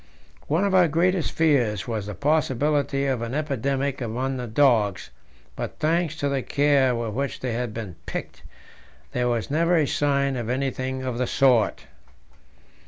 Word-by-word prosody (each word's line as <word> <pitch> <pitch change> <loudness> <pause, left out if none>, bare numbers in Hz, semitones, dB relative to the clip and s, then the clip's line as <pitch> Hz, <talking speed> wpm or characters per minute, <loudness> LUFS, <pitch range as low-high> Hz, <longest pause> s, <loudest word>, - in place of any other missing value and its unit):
One 160 +6 +1
of 200 -1 +1
our 180 -2 +6
greatest 175 +3 +1
fears 125 - +1
was 110 -4 -3
the 105 - -5
possibility 145 -1 +1
of 130 -4 0
an 115 +3 -4
epidemic 140 -2 -1
among 125 +3 -2
the 125 -1 -4
dogs, 110 - +2 0.4
but - - -5
thanks 165 0 0
to 145 -3 -2
the 140 -1 0
care 140 -2 +2
with 115 -2 -3
which 140 +3 -3
they 125 -2 -3
had 120 -1 -2
been 105 -6 -6
picked, - - -6 0.7
there 125 0 0
was 120 +1 -2
never 170 +3 +3
a 155 - +3
sign 140 -1 +1
of 120 -2 -4
anything 130 0 -2
of 125 -2 -3
the 125 - 0
sort. 125 -5 +2
135 Hz, 165 wpm, -24 LUFS, 120-145 Hz, 0.7 s, our